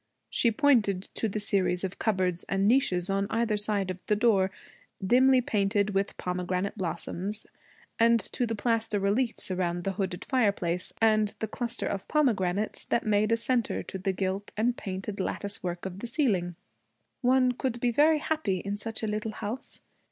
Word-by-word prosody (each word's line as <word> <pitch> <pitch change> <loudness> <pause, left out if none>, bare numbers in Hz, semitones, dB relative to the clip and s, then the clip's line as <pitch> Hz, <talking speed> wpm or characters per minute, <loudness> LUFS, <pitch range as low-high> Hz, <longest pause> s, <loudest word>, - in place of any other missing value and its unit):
She 235 - +3
pointed 215 -7 +3
to 225 - -1
the 215 - -3
series 190 -3 +1
of 190 -1 -4
cupboards 185 -5 0
and 195 +1 +1
niches 190 -8 +3
on 195 0 0
either 230 -1 +1
side 205 -2 0
of 185 0 -9
the 210 - +3
door, 205 -4 +3 0.5
dimly 255 +6 +5
painted 205 -2 +1
with 195 0 -1
pomegranate 180 +2 -2
blossoms, 190 +3 -4 0.5
and 230 0 +5
to 240 +4 -2
the 225 - -2
plaster 225 -1 0
reliefs 210 +2 0
around 175 -1 -1
the 195 - -1
hooded 190 -2 -3
fireplace, 200 -8 0
and 215 -2 +3
the 220 - -3
cluster 235 +2 -3
of 195 -1 -3
pomegranates 215 -9 +1
that 235 - 0
made 215 0 +2
a 230 - +4
centre 235 0 0
to 190 - -6
the 190 +1 0
gilt 190 +2 -3
and 235 +3 +2
painted 195 0 -5
lattice 200 +1 -2
work 175 0 -4
of 190 0 -5
the 240 - -5
ceiling. 205 - 0 0.7
'One 255 0 +4
could 250 -1 -3
be 240 0 +1
very 305 +6 +4
happy 305 -11 -1
in 200 +3 -4
such 220 +1 -5
a - - 0
little 215 +1 -2
house. 220 +4 -5
205 Hz, 175 wpm, -28 LUFS, 190-230 Hz, 0.7 s, dimly